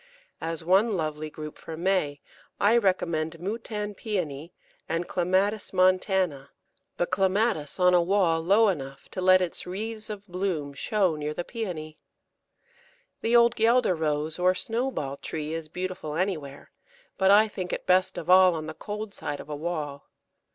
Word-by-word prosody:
As 165 Hz, -1 st, -4 dB
one 195 Hz, +4 st, +3 dB
lovely 155 Hz, -1 st, -3 dB
group 150 Hz, 0 st, -9 dB
for 160 Hz, -, -8 dB
May 170 Hz, -5 st, 0 dB, 0.4 s
I 205 Hz, +3 st, +4 dB
recommend 170 Hz, -6 st, 0 dB
Moutan 210 Hz, +2 st, -4 dB
Pæony 170 Hz, -8 st, -4 dB, 0.4 s
and 165 Hz, +2 st, -1 dB
Clematis 190 Hz, +4 st, 0 dB
montana, 185 Hz, -6 st, +2 dB, 0.5 s
the 175 Hz, -, +1 dB
Clematis 190 Hz, -4 st, 0 dB
on 180 Hz, 0 st, +5 dB
a 175 Hz, -, +5 dB
wall 170 Hz, -3 st, +2 dB
low 200 Hz, +6 st, +4 dB
enough 135 Hz, -6 st, -5 dB
to 185 Hz, -, -5 dB
let 185 Hz, 0 st, +6 dB
its 175 Hz, -, -3 dB
wreaths 215 Hz, +4 st, -4 dB
of 205 Hz, -1 st, -7 dB
bloom 180 Hz, -6 st, -2 dB
show 185 Hz, +3 st, +1 dB
near 150 Hz, 0 st, -4 dB
the 175 Hz, -, -2 dB
Pæony. 170 Hz, -9 st, -5 dB, 1.2 s
The 230 Hz, +1 st, +2 dB
old 235 Hz, 0 st, +6 dB
Guelder 230 Hz, -2 st, +3 dB
Rose 155 Hz, 0 st, -2 dB
or 180 Hz, +1 st, +3 dB
Snowball 225 Hz, -, -2 dB
tree 155 Hz, +1 st, -5 dB
is 165 Hz, -1 st, -4 dB
beautiful 180 Hz, -3 st, -4 dB
anywhere, 160 Hz, -6 st, -3 dB, 0.5 s
but 190 Hz, 0 st, +4 dB
I 210 Hz, +2 st, +7 dB
think 185 Hz, -4 st, -5 dB
it -, -, -4 dB
best 185 Hz, +1 st, +3 dB
of 165 Hz, -, -5 dB
all 185 Hz, -1 st, +7 dB
on 155 Hz, -1 st, -4 dB
the 155 Hz, -, -6 dB
cold 210 Hz, +3 st, -6 dB
side 145 Hz, -1 st, -4 dB
of 145 Hz, -, -10 dB
a 150 Hz, -, -3 dB
wall. 150 Hz, -3 st, -4 dB
180 Hz, 160 wpm, -27 LUFS, 155-200 Hz, 1.2 s, I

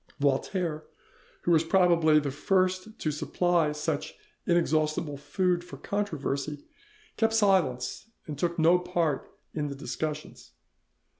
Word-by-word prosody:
Voltaire, 155 Hz, +3 st, 0 dB, 0.6 s
who 175 Hz, -, +1 dB
was 160 Hz, -1 st, +5 dB
probably 170 Hz, -3 st, +4 dB
the 145 Hz, -2 st, -3 dB
first 185 Hz, -, 0 dB
to 155 Hz, -, -1 dB
supply 170 Hz, +1 st, +1 dB
such 150 Hz, 0 st, -3 dB, 0.3 s
inexhaustible 155 Hz, -3 st, +1 dB
food 175 Hz, +4 st, 0 dB
for 140 Hz, -5 st, -10 dB
controversy, 150 Hz, -6 st, -3 dB, 0.5 s
kept 225 Hz, 0 st, +2 dB
silence 190 Hz, -, +1 dB, 0.2 s
and 150 Hz, -, -5 dB
took 170 Hz, +4 st, -1 dB
no 170 Hz, +2 st, +5 dB
part 175 Hz, -5 st, -1 dB, 0.2 s
in 150 Hz, -2 st, -2 dB
the 140 Hz, -, -5 dB
discussions. 150 Hz, +2 st, -5 dB
160 Hz, 120 wpm, -28 LUFS, 150-180 Hz, 0.6 s, was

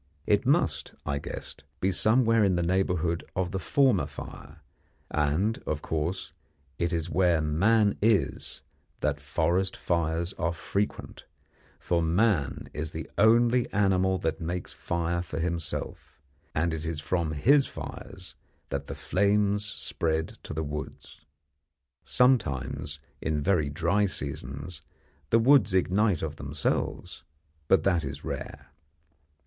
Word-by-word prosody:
It -, -, +2 dB
must, -, -, +1 dB
I 70 Hz, -1 st, -1 dB
guessed, 70 Hz, -, -8 dB, 0.2 s
be 95 Hz, -, +1 dB
somewhere 115 Hz, +3 st, +3 dB
in 95 Hz, -2 st, +3 dB
the 85 Hz, -, +1 dB
neighbourhood 90 Hz, -2 st, 0 dB
of 90 Hz, 0 st, -1 dB
the 95 Hz, -, -2 dB
former 120 Hz, -, +3 dB
fire, 75 Hz, -, -10 dB, 0.5 s
and, 75 Hz, +9 st, +1 dB
of 75 Hz, -1 st, -2 dB
course, 80 Hz, +4 st, -2 dB, 0.5 s
it 85 Hz, 0 st, 0 dB
is 85 Hz, -1 st, -2 dB
where 90 Hz, -1 st, +3 dB
man 100 Hz, +8 st, +2 dB
is 105 Hz, -3 st, +1 dB, 0.4 s
that 75 Hz, -1 st, 0 dB
forest 90 Hz, +6 st, 0 dB
fires 85 Hz, +1 st, 0 dB
are 85 Hz, -1 st, 0 dB
frequent; 100 Hz, +5 st, -3 dB, 0.5 s
for 85 Hz, -1 st, 0 dB
man 85 Hz, -3 st, +1 dB
is 75 Hz, +1 st, -4 dB
the 80 Hz, -1 st, -5 dB
only 120 Hz, +3 st, +4 dB
animal 95 Hz, -2 st, +2 dB
that 80 Hz, -1 st, -2 dB
makes 85 Hz, +2 st, -4 dB
fires 85 Hz, +1 st, -2 dB
for 75 Hz, -, -4 dB
himself, 85 Hz, -1 st, -4 dB, 0.4 s
and 80 Hz, +2 st, +1 dB
it 80 Hz, -1 st, -4 dB
is 80 Hz, -2 st, -3 dB
from 80 Hz, 0 st, -1 dB
his 135 Hz, -, +4 dB
fires 95 Hz, -1 st, -9 dB, 0.4 s
that -, -, -3 dB
the -, -, -5 dB
flames 100 Hz, +1 st, +1 dB
spread 80 Hz, -6 st, -2 dB
to -, -, -9 dB
the 80 Hz, +1 st, -2 dB
woods. 75 Hz, 0 st, -7 dB, 0.8 s
Sometimes, 75 Hz, -, +1 dB, 0.2 s
in 80 Hz, -2 st, 0 dB
very 85 Hz, -6 st, +2 dB
dry 85 Hz, +8 st, +1 dB
seasons, 70 Hz, 0 st, -5 dB, 0.5 s
the 115 Hz, -, +5 dB
woods 125 Hz, -4 st, +5 dB
ignite 95 Hz, 0 st, +2 dB
of 80 Hz, -1 st, -4 dB
themselves, 70 Hz, 0 st, -2 dB, 0.4 s
but 95 Hz, -, +4 dB
that 90 Hz, -4 st, +2 dB
is 70 Hz, -, -6 dB
rare. -, -, -6 dB
85 Hz, 130 wpm, -28 LUFS, 80-100 Hz, 0.8 s, the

